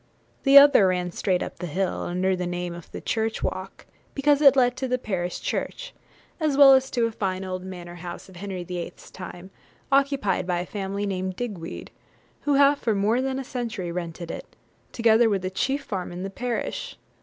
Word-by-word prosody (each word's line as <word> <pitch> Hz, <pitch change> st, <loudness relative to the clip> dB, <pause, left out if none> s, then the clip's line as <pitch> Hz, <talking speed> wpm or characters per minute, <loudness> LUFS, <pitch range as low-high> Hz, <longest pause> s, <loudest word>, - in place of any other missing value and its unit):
The 275 Hz, 0 st, +7 dB
other 280 Hz, -8 st, +8 dB
ran 180 Hz, -1 st, 0 dB
straight 180 Hz, +1 st, 0 dB
up -, -, -8 dB
the 180 Hz, -, -4 dB
hill, 185 Hz, +4 st, -1 dB
under 185 Hz, +2 st, 0 dB
the 180 Hz, -1 st, -3 dB
name 175 Hz, 0 st, -3 dB
of 170 Hz, -1 st, -11 dB
'The -, -, -7 dB
Church 220 Hz, 0 st, -1 dB
Walk,' -, -, -4 dB, 0.3 s
because 290 Hz, +1 st, +3 dB
it 275 Hz, -2 st, +8 dB
led 250 Hz, -2 st, +3 dB
to 260 Hz, -, -2 dB
the 255 Hz, 0 st, +1 dB
parish 185 Hz, -7 st, -3 dB
church, -, -, -4 dB, 0.5 s
as 305 Hz, -4 st, +1 dB
well 275 Hz, -1 st, +9 dB
as 265 Hz, 0 st, +3 dB
to 240 Hz, -2 st, +1 dB
a 230 Hz, -, -1 dB
fine 190 Hz, -3 st, -3 dB
old 185 Hz, -1 st, -4 dB
manor 175 Hz, -2 st, -8 dB
house, 175 Hz, +1 st, -7 dB
of 190 Hz, -2 st, -14 dB
Henry 190 Hz, -1 st, -5 dB
VIII.'s 175 Hz, 0 st, -7 dB
time, 185 Hz, 0 st, -9 dB, 0.4 s
occupied 270 Hz, -10 st, +2 dB
by 180 Hz, -1 st, 0 dB
a -, -, -5 dB
family 200 Hz, +1 st, -3 dB
named 185 Hz, -1 st, -3 dB
Digweed, 200 Hz, -9 st, -6 dB, 0.6 s
who 285 Hz, -, +4 dB
have 280 Hz, +1 st, +5 dB
for 225 Hz, -3 st, 0 dB
more 215 Hz, +5 st, +2 dB
than 265 Hz, 0 st, -1 dB
a 270 Hz, -, -3 dB
century 230 Hz, -9 st, -4 dB
rented 170 Hz, -1 st, -5 dB
it, -, -, -9 dB, 0.4 s
together 230 Hz, 0 st, +4 dB
with 195 Hz, -3 st, 0 dB
the 185 Hz, -, -2 dB
chief 270 Hz, +8 st, -1 dB
farm 190 Hz, -7 st, -4 dB
in 175 Hz, +1 st, -6 dB
the 195 Hz, -, -5 dB
parish. 240 Hz, +3 st, -4 dB
195 Hz, 200 wpm, -25 LUFS, 180-255 Hz, 0.6 s, well